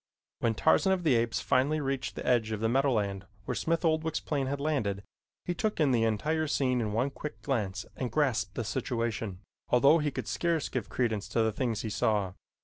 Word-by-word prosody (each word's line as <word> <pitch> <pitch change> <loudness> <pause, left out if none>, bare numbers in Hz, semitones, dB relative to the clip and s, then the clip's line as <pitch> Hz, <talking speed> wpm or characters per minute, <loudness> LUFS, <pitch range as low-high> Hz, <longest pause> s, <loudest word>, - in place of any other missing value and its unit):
When 115 -1 +1
Tarzan 190 - +3
of 185 -2 -1
the 155 -5 +4
Apes 115 -1 +1
finally 140 +3 +2
reached 135 -2 -2
the - - -6
edge 120 -3 +2
of 110 - -2
the 110 - +1
meadowland 110 -7 +1 0.2
where - - -2
Smith 165 +1 0
Oldwick's 160 0 +1
plane 140 -3 -2
had 140 +1 -2
landed, 110 -10 -1 0.4
he 175 - -1
took 215 +2 -1
in 150 -4 +4
the 115 -2 +3
entire 155 +9 0
scene 130 -4 +1
in 110 -2 -1
one 125 +6 0
quick 150 +2 -7
glance 105 -9 -1
and 125 -2 -3
grasped 115 -10 +1
the 120 - -2
situation, 115 -4 -2 0.3
although 140 +6 +5
he 150 -1 0
could - - -5
scarce 170 -4 0
give - - -3
credence 110 -5 -1
to 115 - +1
the 110 - +2
things 115 -1 -1
he 110 - -3
saw. 105 -3 +1
125 Hz, 205 wpm, -30 LUFS, 110-150 Hz, 0.4 s, although